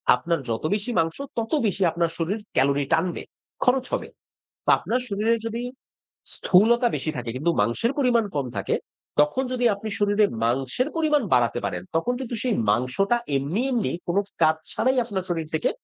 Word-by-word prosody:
আপনার 165 +6 -1
যত 115 +4 -2
বেশি 215 +4 -3
মাংস, 165 0 0 0.2
তত 225 -1 -2 0.2
বেশি 195 0 -2
আপনার 170 0 0
শরীর 185 +6 -1 0.2
ক্যালোরি 140 +1 +3
টানবে, 170 +2 0 0.4
খরচ 255 0 +3
হবে। - - -1 0.6
তো - - 0
আপনার 250 +2 -1
শরীরে 215 +3 +2
যদি 230 +2 -4 0.7
স্থূলতা 235 +6 +4
বেশি 155 - -2
থাকে 120 -1 -4
কিন্তু 170 +5 +1
মাংসের 120 - +1
পরিমাণ 240 -4 +3
কম 140 -2 0
থাকে, 100 - 0 0.5
তখন 150 - +1
যদি 245 -1 0
আপনি 215 +2 -6
শরীরে 205 +1 +4 0.2
মাংসের 135 - 0
পরিমাণ 305 -2 +3
বাড়াতে 120 -1 +3
পারেন, - - -3
তখন 240 +10 +1
কিন্তু 245 -2 -4
সেই 250 -3 +1 0.2
মাংসটা 130 - +1 0.2
এমনি, 150 - -1
এমনি, 235 -5 0 0.2
কোনো 175 +3 +2 0.2
কাজ 160 0 +5 0.2
ছাড়াই 260 +3 +1
আপনার 195 -5 -3
শরীর 165 -3 -2
থেকে 155 - +1
195 Hz, 165 wpm, -24 LUFS, 150-235 Hz, 0.7 s, কাজ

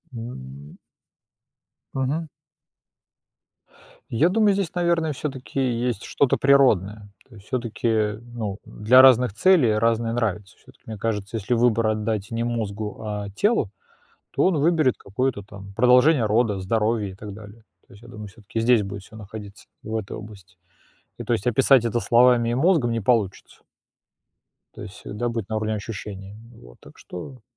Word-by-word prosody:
М. 70 - -9 1.2
Мгм. 145 +5 -2 1.8
Я 150 +9 +2
думаю, 210 +1 +3
здесь, 195 -4 -2
наверное, 170 -3 +1
всё-таки 135 -1 -5
есть 120 -4 -1
что-то 140 - +1
природное. 110 -7 +3 0.2
То 120 - -16
есть 100 -1 -16
всё-таки, 110 -3 -1
ну, 115 -4 -6
для 120 +5 +5
разных 125 -4 +5
целей 135 - +4
разные 115 +1 +1
нравятся. 105 -4 -3
Всё-таки - - -22
мне 110 -1 -7
кажется, 105 0 -3
если 110 +3 -2
выбор 115 -1 +2
отдать 110 -1 -2
не 115 0 -2
мозгу, 110 -3 -4
а 105 -1 -4
телу, 205 - +1 0.6
то - - 0
он 185 -3 +2
выберет 155 -4 +2
какое-то 110 +1 -2
там 100 -1 -12
продолжение 125 +4 +4
рода, 105 -1 +1
здоровье, 105 +1 0
и - - -12
так 105 0 -9
далее. 105 +2 -13 0.2
То - - -18
есть 100 - -16
я - - -13
думаю, 110 -3 -9
всё-таки 110 +2 -6
здесь 115 -2 +4
будет 100 0 -7
всё 110 - -14
находиться, 105 -1 -10 0.2
в 110 +1 -5
этой 105 -2 -6
области. 100 -4 -12 0.6
И, - - -6
то - - 0
есть 100 - -2
описать 130 +1 +4
это 115 0 0
словами 120 0 +4
и - - 0
мозгом 145 -4 +2
не 115 -1 -1
получится. 105 -3 -1 1.1
То - - -11
есть 95 - -9
всегда 105 +4 -5
быть 115 -4 -4
на 110 - -1
уровне 110 0 -2
ощущений. 100 -1 -7 0.2
Вот, - - -16
так - - -17
что 125 +9 -10
115 Hz, 155 wpm, -23 LUFS, 105-125 Hz, 1.8 s, для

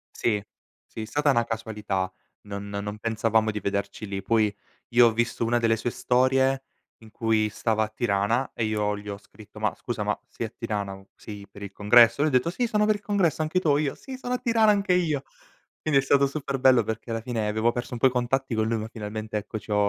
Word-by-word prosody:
Sì. 105 -3 0 0.4
Sì, 110 - -7
stata 145 +5 +2
una 120 -2 +2
casualità, 105 -4 -3 0.3
non 100 0 -7
no 100 0 -4
non 105 +1 -5
pensavamo 110 0 +1
di 105 -1 -3
vederci 100 +2 -3
lì. 100 -1 -4
Puoi, 105 0 +2 0.4
io 120 0 +6
ho 115 - +1
visto 115 0 0
una 120 +1 +2
delle 115 -1 +2
sue 115 - -2
storie 130 +2 +2 0.3
in 110 -1 -16
cui 110 -1 +1
stava 110 +1 0
a 110 - -2
Tirana, 110 +3 0
e 115 - -1
io 105 -1 0
gli 105 0 -10
ho 100 -1 -4
scritto: 105 +1 -17
"Ma, 105 - +1
scusa 115 -4 -4
ma 105 0 -1
sei 115 - -5
a - - -13
Tirana? 105 -4 -4
U 95 0 -16
sei 100 -2 -10
per 100 +1 -11
il 100 - -6
congresso?" 115 +6 +5
Lui 155 - +3
ha 140 - -6
detto: 125 +6 +3
"Sì, 240 +8 -1
sono 210 -1 +2
per 215 0 +3
il 205 - -8
congresso, 190 -8 +1
anche 155 +4 +1
tu?" 160 - +1
O 145 - +4
io: 145 -2 -1
"Sì, 265 -1 -9
sono 250 -1 -4
a - - +1
Tirana 230 -4 +3
anche 200 -2 +1
io!" 155 -6 +1 0.6
Quindi 150 -3 +3
è - - -8
stato 140 0 +4
super 140 -2 -4
bello, 130 -3 +5
perché 110 +2 -5
alla 115 0 -2
fine 115 -3 -2
avevo 110 +2 +1
perso 120 +1 -5
un 120 - -4
po' 130 - +6
i - - +3
contatti 125 +1 0
con 110 0 +1
lui 115 0 0
ma 110 - -4
finalmente, 110 -1 -5
ecco, 105 +1 -5
ci 105 - -11
ho - - +2
115 Hz, 240 wpm, -26 LUFS, 105-135 Hz, 0.6 s, io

